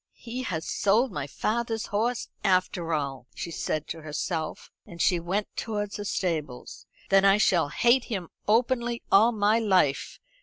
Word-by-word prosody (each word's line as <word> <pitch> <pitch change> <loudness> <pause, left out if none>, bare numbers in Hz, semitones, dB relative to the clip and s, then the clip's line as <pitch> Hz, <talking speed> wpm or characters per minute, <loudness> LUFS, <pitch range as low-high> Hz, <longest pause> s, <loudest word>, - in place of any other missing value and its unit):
"He 245 +2 -6
has 170 -10 -3
sold 225 +6 +2
my 145 -2 -4
father's 225 +7 -2
horse, 230 +4 -1 0.2
after 185 -2 +1
all," 140 -5 -2
she 170 - -5
said 155 -1 -3
to 160 - -5
herself, 155 +1 -4 0.2
as 170 - -11
she 175 +1 +3
went 190 +5 -3
towards 210 -2 -3
the 205 - -5
stables. 155 -10 -3 0.2
"Then 195 0 +6
I 195 0 +6
shall 175 -7 +3
hate 240 - +3
him 190 -7 -4 0.2
openly 235 +1 +1
all 220 +4 +6
my 215 0 +2
life. 185 -10 +1
195 Hz, 155 wpm, -27 LUFS, 165-225 Hz, 0.2 s, Then